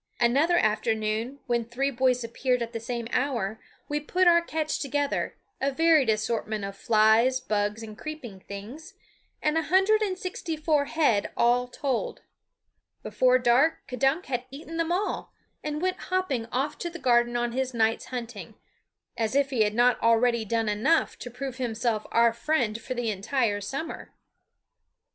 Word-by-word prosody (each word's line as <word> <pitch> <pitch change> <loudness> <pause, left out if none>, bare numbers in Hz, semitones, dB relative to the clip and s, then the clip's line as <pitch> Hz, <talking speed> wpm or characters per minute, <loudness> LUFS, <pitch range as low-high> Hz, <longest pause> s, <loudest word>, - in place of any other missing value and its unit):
Another 280 +9 +3
afternoon, 220 +3 0
when 240 -2 0
three 255 +5 -2
boys 250 -1 +1
appeared 250 +1 0
at 235 +1 -7
the 230 - -3
same 235 0 -4
hour, 230 -6 -1 0.3
we 295 0 -1
put 360 +5 +1
our 340 -1 +6
catch 315 -2 -2
together, 285 0 -1 0.2
a 275 +1 +1
varied 315 -3 +4
assortment 215 -1 -1
of 195 0 -6
flies, 220 +5 +4
bugs, 210 -2 -1
and 215 -1 -8
creeping 250 -8 -8
things, 225 - -9 0.5
a 310 +1 +2
hundred 385 +6 +3
and 385 -3 -1
sixty 360 -3 -4
four 300 -2 +1
head 280 -10 +1
all 245 +1 +3
told. 260 0 -3 0.8
Before 255 0 +3
dark 255 +6 +2
K'dunk 270 +7 0
had 245 -1 -3
eaten 310 +4 -8
them 330 0 0
all, 380 +4 -2 0.3
and 300 +2 -3
went 370 0 0
hopping 330 -11 -1
off 275 +5 -2
to 345 - -3
the 345 - -8
garden 240 -4 +2
on 240 0 -1
his 260 +1 -1
night's 225 -2 +1
hunting 230 -6 -7 0.6
as 225 +2 -1
if 280 -1 +2
he 245 -4 +1
had 210 0 +2
not 245 +1 +3
already 230 0 +3
done 225 +1 0
enough 225 +11 +2
to 245 - -7
prove 255 +1 -6
himself 235 -3 -1
our 235 0 +4
friend 235 -4 -1
for 255 - -5
the 240 -2 -1
entire 210 +1 0
summer. 275 +10 -5
250 Hz, 160 wpm, -27 LUFS, 225-295 Hz, 0.8 s, our